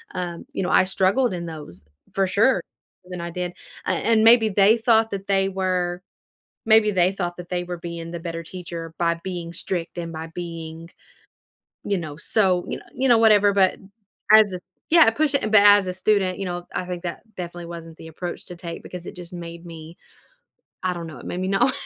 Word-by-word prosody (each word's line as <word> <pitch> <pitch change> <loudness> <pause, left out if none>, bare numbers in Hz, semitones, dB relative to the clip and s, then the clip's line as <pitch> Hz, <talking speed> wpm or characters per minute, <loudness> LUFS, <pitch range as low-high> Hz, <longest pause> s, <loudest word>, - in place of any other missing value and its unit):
um, 175 -2 -4
you - - -2
know, 180 - -1
I - - +5
struggled 190 +5 +2
in 170 -1 -4
those 150 - -9 0.3
for 195 - +2
sure 200 +1 +3 0.5
than 180 - -6
I 170 0 -5
did, 180 0 -4 0.3
a - - -2
and 220 +5 +2
maybe 225 0 +7
they 205 +3 +5
thought 225 -1 +3
that 195 0 -5
they 195 -1 +2
were 180 -2 -1 0.6
maybe 220 -1 +5
they 185 -1 +3
thought 175 -3 -4
that 175 -1 -9
they 180 -1 -1
were 175 0 -5
being 170 0 -7
the 170 - -5
better 165 0 -5
teacher 165 -2 -7
by 170 -1 +2
being 175 -2 -5
strict, 175 0 -3
and 170 -1 -4
by 160 +1 -6
being, 165 -1 -7 0.9
you 200 -1 0
know, 155 -4 -6
so, 185 -1 +2
you - - -3
kno - - -14
you 265 - +1
know, 235 - +7
whatever, 210 -2 +5
but 190 -2 +3 0.5
as 205 -4 +6 0.3
Yeah, 330 -7 +7
pushi 290 +2 +1
but 215 0 0
as 205 -2 +6
a 180 - -2
student, 190 -1 +1
you 195 - -3
know, 175 -1 -5
I 180 - -2
think 180 -1 -6
that 175 -1 -5
definitely 175 -1 -6
wasn't 165 -1 -9
the 160 - -11
approach 175 +2 -6
to 180 - -8
take 170 -1 -7
because 180 -1 -8
it - - -8
just 180 0 -10
made 170 0 -8
me 165 0 -10 0.9
I 185 - +1
don't 170 -1 -6
know, 155 - -10
it - - -11
made 180 - -4
me 185 - -1
know 240 +7 +3
180 Hz, 205 wpm, -23 LUFS, 170-200 Hz, 0.9 s, maybe